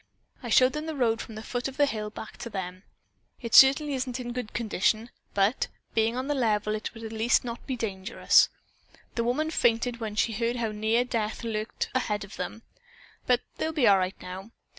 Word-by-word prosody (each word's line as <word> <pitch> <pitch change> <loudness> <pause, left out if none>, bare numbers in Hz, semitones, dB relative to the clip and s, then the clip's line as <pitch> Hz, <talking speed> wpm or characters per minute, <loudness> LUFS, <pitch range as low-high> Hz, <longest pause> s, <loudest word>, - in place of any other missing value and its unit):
I 240 - -6
showed 255 +3 +5
them 305 +1 -4
the 320 - -3
road 230 -4 +1
from 220 - -9
the 215 - -7
foot 245 +2 -3
of 270 - -8
the 290 - +5
hill 215 -5 -3
back 215 +1 -9
of 235 - -6
them. 185 -1 -5 0.6
It 230 -3 -6
certainly 275 +2 +7
isn't 255 -1 -2
in 240 -1 -5
good 245 -3 -4
condition, 220 +1 0 0.2
but, 200 +5 +2 0.3
being 225 +1 +2
on 260 +1 -2
the 290 - +1
level, 215 -5 +1
it 215 - -3
at 225 - -9
least 225 +2 +2
will 245 - -4
not 235 - -10
be 265 - -1
dangerous. 200 -2 +3 0.6
The 235 - 0
woman 300 +7 0
fainted 235 -3 +1
when 220 -2 -4
she 225 +1 +1
heard 230 +3 0
how 230 -3 -1
near 220 +3 +1
death 225 -2 -2
lurked 220 -1 -3
ahead 210 -5 0
of 200 - -10
them, 180 +5 -5 0.6
but 250 -1 +3 0.2
they'll 320 - 0
be 290 -6 +3
all 195 -1 +6
right 185 +1 -2
now. 185 +3 -8
230 Hz, 205 wpm, -27 LUFS, 215-250 Hz, 0.6 s, certainly